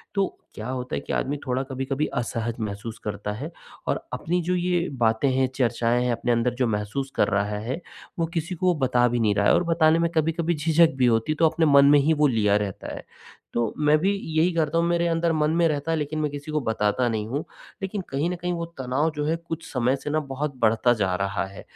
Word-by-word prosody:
तो 195 -1 +2 0.3
क्या 110 - -6
होता 130 -1 -3
है - - -1
कि - - -5
आदमी 145 +2 -1
थोड़ा 130 0 0
कभी-कभी 135 +2 -2 0.2
असहज 115 0 -3
महसूस 110 +1 -5
करता 105 0 -4
है 140 +10 -6 0.4
और - - 0
अपनी 175 +2 -1
जो 180 +2 0
ये 175 -1 0 0.2
बातें 115 +5 +3
हैं, 130 0 +3
चर्चाएँ 120 -1 +1
हैं, 125 - +1
अपने 120 +1 -1
अंदर 120 0 +1
जो 125 -1 +1
महसूस 110 +6 -2
कर - - +3
रहा 105 0 0
है 125 +10 -4 0.4
वो 165 - +2
किसी 170 +2 -2
को 180 +1 +2
बता 125 -2 +3
भी 120 0 0
नहीं 110 -3 +3
रहा 100 0 +2
है - - +5
और - - +3
बताने 165 -1 +3
में 170 0 +2
कभी-कभी 165 +2 +1
झिझक 160 +2 +4
भी 130 - +3
होती, 115 +5 +2
तो 160 +1 +3
अपने 160 +1 +1
मन 140 -2 +6
में 145 0 +7
ही 150 +3 +3
वो 150 -1 +3
लिया 105 -5 +2
रहता 100 -2 -4
है। - - -9 0.5
तो 115 -2 0
मैं 150 0 +4
भी 190 +5 +2 0.3
यही 170 +3 +4
करता 160 -1 0
हूँ, 170 - +3
मेरे 170 0 +1
अंदर 165 0 +1
मन 155 -1 +1
में 170 - +5
रहता 150 +1 -1
है, 165 - +1
लेकिन 150 +1 -3
मैं 150 -2 -1
किसी 145 +1 -7
को 155 - +1
बताता 110 +1 0
नहीं 110 -2 -2
हूँ, 140 +6 -2 0.4
लेकिन 195 +1 -3
कहीं 140 +5 -1
न 180 - -2
कहीं 175 +1 -3
वो 170 -1 -3
तनाव 135 +5 0
जो 150 0 -2
है 160 +2 +1 0.2
कुछ 165 - -6
समय 125 +1 +1
से 140 - -6
ना 155 +1 +1
बहुत 140 0 -4
बढ़ता 115 +1 +3
जा 95 -2 +1
रहा 100 0 -1
है। 95 0 -10
140 Hz, 240 wpm, -25 LUFS, 115-160 Hz, 0.5 s, में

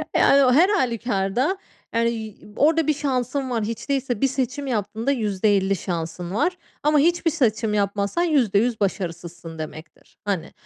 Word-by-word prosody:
Yani, 275 0 +5
o 250 - +4
her 340 +8 +5
hâlükârda, 245 - 0 0.4
yani, 230 0 +2
y 220 -3 -6 0.2
orada 320 +1 +3
bir 305 - +4
şansın 270 -1 -2
var. 235 -3 -1
Hiç 225 +5 -5
değilse 260 -5 -1
bir 270 - +4
seçim 265 +1 -2
yaptığında 220 +1 -1
%50 205 -4 +1
şansın 170 0 -4
var. 360 +10 +1 0.3
Ama 300 0 +4
hiçbir 335 +2 +2
seçim 225 -8 +1
yapmazsan 200 - 0
%100 240 - +2
başarısızsın 170 -4 -4
demektir, 155 +1 -10
hani 190 -5 -2
230 Hz, 145 wpm, -23 LUFS, 200-275 Hz, 0.4 s, Yani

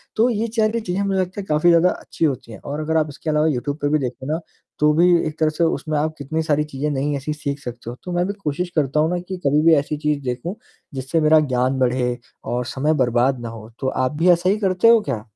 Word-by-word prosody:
तो 230 +3 +3
ये 230 0 -1
चैरिटी 220 +1 +2
ची 180 - -2
हैं 200 - 0
मुझे 190 -1 0
लगता 185 +2 -4
है - - -10
काफ़ी 155 +3 +3
ज़्यादा 170 +2 +5
अच्छी 165 - -3
होती 130 -5 -2
हैं - - -9
और 145 +2 -5
अगर 160 +1 0
आप 155 -1 +1
इसके 150 +3 -6
अलावा 150 +1 +2
यूट्यूब 145 +1 -1
पे 145 - +1
भी 155 0 +2
देखो 130 0 -5
ना, 165 - -1 0.4
तो 150 0 +4
भी 170 +3 +4 0.2
एक 155 - -7
तरह 155 -1 +3
से 155 +2 -1
उसमें 155 -2 0
आप 155 +1 -1
कितनी 160 +3 -2
सारी 150 -1 +1
चीज़ें 145 +3 -1
नई 145 +1 -1
ऐसी 150 +3 -3
सीख 145 -1 -4
सकते 120 -3 -7
हो। 120 - -6
तो 180 - -6
मैं 175 +1 +1
भी 200 - -2
कोशिश 175 +5 -2
करता 150 0 +1
हूँ 160 +2 +3
ना 175 - -1
कि 190 -1 -4
कभी 145 +2 +3
भी 165 - +7
ऐसी 145 +1 -1
चीज़ 150 -1 -1
देखूँ, 125 - -3 0.4
जिससे 135 +5 -1
मेरा 155 +1 +6
ज्ञान 130 -2 0
बढ़े 125 -1 +1 0.3
और 125 0 -2
समय 150 +4 +2
बर्बाद 120 +2 +1
ना 115 - -5
हो। 110 -1 -10
तो 130 - -2
आप 130 0 0
भी 175 +3 +3
ऐसा 175 +2 +2
ही 205 - +2
करते 190 +2 +3
हो 230 -1 +7
क्या? 110 -5 -2
150 Hz, 265 wpm, -21 LUFS, 135-170 Hz, 0.4 s, भी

